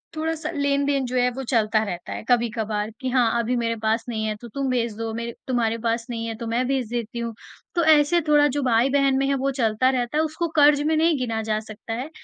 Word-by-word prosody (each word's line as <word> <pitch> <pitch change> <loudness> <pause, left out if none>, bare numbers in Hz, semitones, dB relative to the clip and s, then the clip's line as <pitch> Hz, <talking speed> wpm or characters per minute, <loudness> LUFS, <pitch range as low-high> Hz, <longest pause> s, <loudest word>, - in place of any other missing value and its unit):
थोड़ा-सा 320 +1 -2
लेन-देन 280 -1 +1
जो 250 - -4
है 250 0 +3
वो 270 - -4
चलता 220 -3 +1
रहता 180 -4 -5
है - - -6
कभी-कभार 220 -3 0
कि 260 - -2
हाँ 235 -2 +2
अभी 235 +2 0
मेरे 230 -1 0
पास 220 +1 +1
नहीं 220 -2 -2
है 215 -1 -1
तो 240 - -8
तुम 270 +4 -3
भेज 235 -3 0
दो, 225 -1 -3
मेरे 235 +1 -4
तुम्हारे 230 -3 0
पास 230 0 0
नहीं 230 -1 -3
है 225 - -4
तो 230 -1 -6
मैं 235 +3 0
भेज 265 -4 -1
देती 235 0 -4
हूँ। 235 -1 -3 0.4
तो 340 - +2
ऐसे 315 +2 +5
थोड़ा 295 -1 +5
जो 290 +1 -1
भाई-बहन 265 +3 +3
में 275 - +1
है 275 - +1
वो 270 +1 0
चलता 245 -1 +1
रहता 255 +2 -1
है, 315 - +3
उसको 320 +2 -2
कर्ज़ 290 -1 +5
में 315 +1 +1
नहीं 325 -1 +3
गिना 225 -3 -2
जा 215 -1 -1
सकता 220 +1 -8
है। 255 +6 -4
245 Hz, 240 wpm, -23 LUFS, 225-280 Hz, 0.4 s, ऐसे